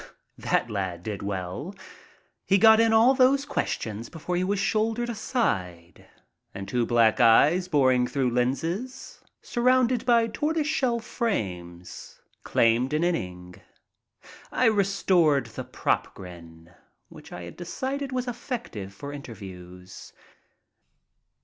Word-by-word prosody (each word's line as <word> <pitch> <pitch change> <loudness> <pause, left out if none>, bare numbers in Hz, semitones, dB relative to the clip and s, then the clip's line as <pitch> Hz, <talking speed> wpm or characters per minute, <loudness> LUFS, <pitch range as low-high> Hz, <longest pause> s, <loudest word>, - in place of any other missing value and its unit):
That - - 0
lad 95 -4 -3
did 105 0 -5
well. 100 - -5 0.7
He 195 - +4
got 220 +2 +7
in 225 0 +4
all 225 +4 +5
those 270 +1 +3
questions 110 - -3
before 175 +2 -5
he 180 - 0
was 200 +2 0
shouldered 225 +4 0
aside 90 - -3 0.5
and 100 0 -6
two 120 -2 0
black 115 0 +3
eyes 145 +10 +5
boring 130 -6 +3
through 130 -3 -1
lenses 165 - -3 0.2
surrounded 250 0 +2
by 235 -2 +4
tortoise 300 +7 -1
shell 260 -6 0
frames 90 - -5 0.2
claimed 115 +4 +2
an 155 +2 +1
inning. 90 - -3 0.9
I 255 - +1
restored 190 - +2
the 115 - -7
"prop - - -2
grin" 85 -2 -12 0.4
which - - -14
I 90 - -7
had 85 - -9
decided 265 +10 -4
was 255 0 -2
effective 220 - -6
for 140 +7 -8
interviews. 95 -8 -11
150 Hz, 120 wpm, -26 LUFS, -, 0.9 s, got